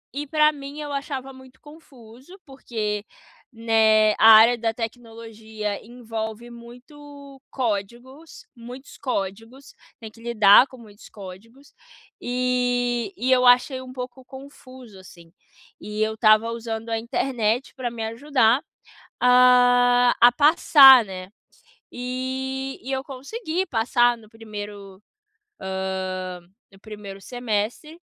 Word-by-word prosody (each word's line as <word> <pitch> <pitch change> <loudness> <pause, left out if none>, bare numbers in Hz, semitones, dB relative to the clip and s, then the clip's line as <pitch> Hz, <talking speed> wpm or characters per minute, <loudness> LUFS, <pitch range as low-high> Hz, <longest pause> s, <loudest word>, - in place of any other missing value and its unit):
e 295 0 -5
pra 305 0 +3
mim 285 0 -10
eu 295 -1 -6
achava 270 -1 -6
muito 260 0 -17
confuso, 280 - -16
porque, 220 -6 -5 0.5
né, 220 -2 +3
a 225 - +7
área 225 +3 +7
da 225 -1 -1
tecnologia 225 -2 -7
envolve 230 -1 -7
muito 275 +3 -14
códigos 245 +7 -6
muitos 245 +4 -12
códigos, 225 +2 -6 0.3
tem 220 -2 -10
que 230 - -19
lidar 230 +1 +5
com 260 - -15
muitos 210 -2 -16
códigos 215 +8 -14 0.5
e 245 +2 -1
e 255 +1 -1
eu 255 -1 +4
achei 250 +2 +3
um 255 0 -11
pouco 255 0 -9
confuso, 260 -5 -14
assim, 170 -3 -17 0.5
e 210 +1 -6
eu 220 0 -2
estava 220 0 +3
usando 230 -1 -6
a 225 - -1
internet 235 -1 -2
pra 250 -3 -4
me 230 -1 -6
ajudar 250 0 +1 0.6
a 245 0 +4
a 240 +1 +8
passar, 270 -3 +6
né, 185 -1 -9 0.6
e 260 +2 -5
eu 265 0 -3
consegui 320 - -5
passar 240 0 +1
no 215 -2 -19
1º, 205 -3 -10 0.6
hã, 185 -1 -5 0.3
no 195 - -20
1º 205 -2 -10
semestre 245 - -4
240 Hz, 115 wpm, -22 LUFS, 220-260 Hz, 0.6 s, a